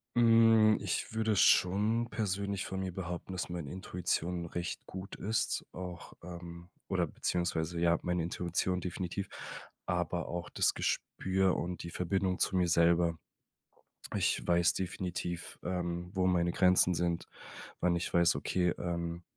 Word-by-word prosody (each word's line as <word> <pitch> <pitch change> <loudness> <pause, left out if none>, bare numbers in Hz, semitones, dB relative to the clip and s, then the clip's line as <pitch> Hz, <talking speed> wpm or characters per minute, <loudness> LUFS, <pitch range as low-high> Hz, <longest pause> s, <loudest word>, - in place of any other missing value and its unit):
Hm, 115 -2 +6
ich 100 +2 -2
würde 110 -2 +1
schon 110 +6 +4
persönlich 100 -2 -2
von 95 0 -4
mir 95 - -3
behaupten, 90 0 -5
dass 90 -1 -3
meine 85 -5 -5
Intuition 90 -1 -2
recht 85 +1 -4
gut 95 +1 -7
ist. 110 +2 -1
Auch, 90 -2 -8
ähm 85 0 -9 0.2
oder - - +1
beziehungsweise 85 -1 -1
ja, 85 0 +4
meine 90 -1 0
Intuition 90 +1 -1
definitiv, 90 +2 -4 0.6
aber 90 -1 -1
auch 85 0 -4
das - - +2
Gespür 95 0 0
und 90 +1 -3
die 85 - -6
Verbindung 90 +1 0
zu 95 - +1
mir 90 -1 +3
selber. 85 0 +3 1.0
Ich - - +1
weiß 85 0 +4
definitiv, 90 -2 -4
ähm, 85 -1 -3
wo 95 -1 +2
meine 85 -1 +2
Grenzen 90 0 +4
sind, 85 0 -1 0.5
wann 90 -1 +3
ich 85 - -3
weiß: 85 0 +4
Okay, 90 -1 +1
ähm 85 0 -3
90 Hz, 140 wpm, -32 LUFS, 85-95 Hz, 1.0 s, Hm